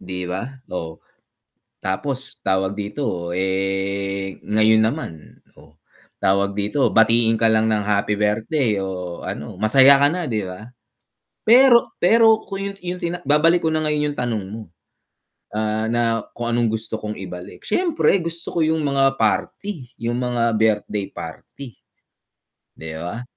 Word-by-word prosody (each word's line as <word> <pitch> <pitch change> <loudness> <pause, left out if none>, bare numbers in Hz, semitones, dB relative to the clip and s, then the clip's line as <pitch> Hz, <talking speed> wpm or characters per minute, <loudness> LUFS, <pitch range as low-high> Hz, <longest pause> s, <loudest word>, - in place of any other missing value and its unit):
'Di 90 0 -5
ba, 90 +3 -3 0.3
oh. 80 -2 -5 0.8
Tapos, 130 +8 -2
tawag 95 0 0
dito 100 -4 -4
eh, 95 +1 -2
ngayon 110 +1 +3
naman, 110 - -3 0.2
oh. - - -19 0.4
Tawag 100 +1 +1
dito, 105 +7 +1
batiin 115 0 +3
ka 115 - +1
lang 110 0 +2
ng 105 -2 0
happy 105 0 0
birthday 105 +2 0
o 90 -2 -5
ano, - - -6
masaya 135 +5 +6
ka 145 - +5
na 175 +2 -2
'di 110 -7 -2
ba? 90 +4 -9 0.8
Pero 240 +1 +6
pero 220 +3 +4
kung 195 -1 -5
yun - - -14
yung 180 +1 -3
tina 170 +1 -2
babalik 155 +5 +4
ko - - +3
na 155 - 0
ngayon 150 -1 0
yung - - -17
tanong 115 -4 -2
mo, 110 - -6 0.9
ah, 110 +1 -1
na 115 -1 +1 0.2
kung 120 0 -1
anong 120 -2 +1
gusto 110 0 -3
kong 105 0 -6
ibalik, 90 0 -10
siyempre 325 - +2
gusto 165 0 -5
ko - - -1
yung 160 0 +1
mga 135 -1 +2
party, 130 - -2 0.2
yung 120 +1 -1
mga 120 -1 -1
birthday 105 -2 0
party. 110 - -9 1.0
'Di 80 0 -8
ba? 95 +8 -5
110 Hz, 145 wpm, -21 LUFS, 100-145 Hz, 1.0 s, masaya